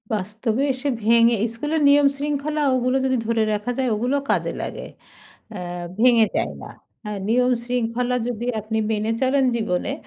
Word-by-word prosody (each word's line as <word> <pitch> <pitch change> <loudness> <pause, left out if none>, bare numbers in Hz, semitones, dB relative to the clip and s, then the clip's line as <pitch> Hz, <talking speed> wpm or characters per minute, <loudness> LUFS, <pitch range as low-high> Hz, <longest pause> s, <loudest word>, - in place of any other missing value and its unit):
বাস্তবে 215 +4 -2
এসে 260 +3 -5 0.2
ভেঙে 230 +1 +5 0.2
স্কুলের 300 +7 -2
নিয়মশৃঙ্খলা 285 +1 +1
ওগুলো 255 +1 +1
যদি 260 -1 +1
ধরে 230 -1 +1
রাখা 210 +4 -2
যায়, 260 -2 0
ওগুলো 245 +6 0
কাজে - - +1
লাগে - - -6 0.7
অ্যা 175 -3 -6
ভেঙে 235 -1 +5
যায় 75 - -1
না। - - -9 0.3
হ্যাঁ, 210 -1 -4
নিয়ম 250 +2 +3
শৃঙ্খলা 245 0 -1
যদি 240 0 -4
আপনি 220 +1 -3
মেনে 215 0 -1
চলেন 265 +1 +2
জীবনে, 195 -6 -1
240 Hz, 150 wpm, -22 LUFS, 215-260 Hz, 0.7 s, ভেঙে